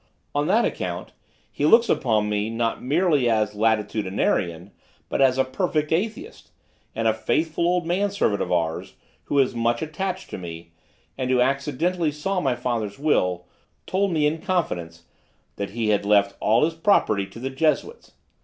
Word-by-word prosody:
On 145 +1 0
that 220 +6 +3
account 90 -1 -4 0.4
he - - -4
looks 230 +7 +6
upon 110 -4 +1
me, 105 +1 -1
not 115 0 -1
merely 145 -2 +2
as 110 -2 +1
Latitudinarian, 105 -4 0 0.4
but - - 0
as 130 -1 +4
a 130 - +4
perfect 150 +2 -1
Atheist, 205 +7 -3 0.5
and 115 0 0
a 110 - +4
faithful 155 +9 0
old 175 -1 +1
manservant 190 - 0
of - - -2
ours, 80 -2 -1 0.3
who 145 - -1
is 135 -2 +3
much 120 +1 0
attached 185 +4 -4
to - - -5
me, 85 -1 -9 0.5
and 130 -1 -1
who 130 -1 +3
accidentally 150 +6 0
saw 180 +6 -2
my 135 -5 +1
father's 115 -4 -3
will, 90 - +1 0.4
told 195 +1 0
me 155 -3 +2
in 155 +2 0
confidence 85 - -2 0.5
that 100 - -3
he 110 +1 -2
had 105 -1 +2
left 100 -1 +3
all 115 +7 +3
his 165 - -2
property 160 - +2
to 115 - -12
the 135 +2 -4
Jesuits. 160 - -1
130 Hz, 165 wpm, -24 LUFS, 105-165 Hz, 0.5 s, looks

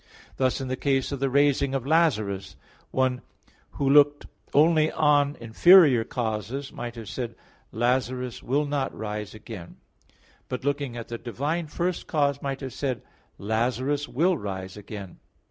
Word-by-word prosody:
Thus 130 0 +1
in 135 - -4
the 130 - -1
case 135 0 0
of 140 - -3
the 135 0 +1
raising 140 0 +2
of 130 -2 -2
Lazarus, 115 - +1 0.3
one 130 -1 0 0.5
who 140 - -1
looked 145 +1 +5 0.3
only 155 +1 +4
on 145 -1 +3
inferior 130 +2 +6
causes 115 +4 -4
might 120 0 -6
have 115 -2 -8
said: 120 0 -5 0.4
"Lazarus 125 +1 -1
will 145 +4 0
not 140 -2 -2
rise 105 -1 -5
again," 110 -6 -10 0.7
but 125 +1 -4
looking 140 -4 -1
at 115 - -7
the 115 -1 -5
divine 145 +8 -2
first 175 +4 -2
cause 140 -2 +1
might 135 0 -3
have 130 -3 -6
said: 130 -5 -3 0.3
"Lazarus 125 +7 -1
will 175 +7 +2
rise 95 -2 -5
again." 100 -3 -9
130 Hz, 145 wpm, -26 LUFS, 115-145 Hz, 0.7 s, inferior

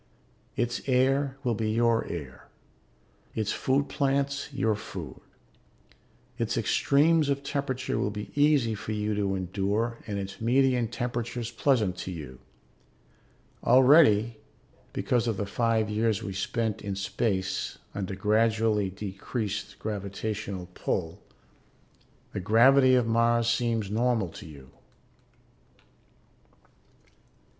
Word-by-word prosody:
Its 120 0 -1
air 135 +1 +2
will 120 -3 +1
be 110 0 -1
your 115 +1 +2
air; 70 -7 -7 0.9
its 110 -2 -1
food 140 +2 0
plants 140 +1 -1
your 115 -5 +1
food. 95 - -8 1.2
Its - - -1
extremes 150 +1 +3
of 140 0 -1
temperature 140 -2 -2
will - - 0
be 105 0 -7
easy 145 -6 +3
for 110 +1 -5
you 105 0 -1
to 100 -2 0
endure 100 +5 -1
and 105 -2 -3
its 95 +1 -6
median 125 0 +2
temperatures 120 0 -4
pleasant 115 -7 +1
to - - -5
you. 75 -8 -8 1.2
Already, 120 -4 +5 0.5
because 120 -1 0
of 110 -3 -1
the 100 - -2
five 115 +1 +1
years 105 -1 0
we 95 - -4
spent 110 +2 -2
in 100 -1 -4
space 95 -1 -2 0.2
under 95 -1 -4
gradually 110 0 +2
decreased 100 +2 -5
gravitational 100 -2 -4
pull, 90 +2 -3 1.1
the - - -2
gravity 130 +6 +5
of 125 -2 +3
Mars 115 0 +2
seems 115 -3 0
normal 115 -3 +1
to 80 - -11
you. 70 -4 -13
110 Hz, 115 wpm, -27 LUFS, 100-125 Hz, 1.2 s, Already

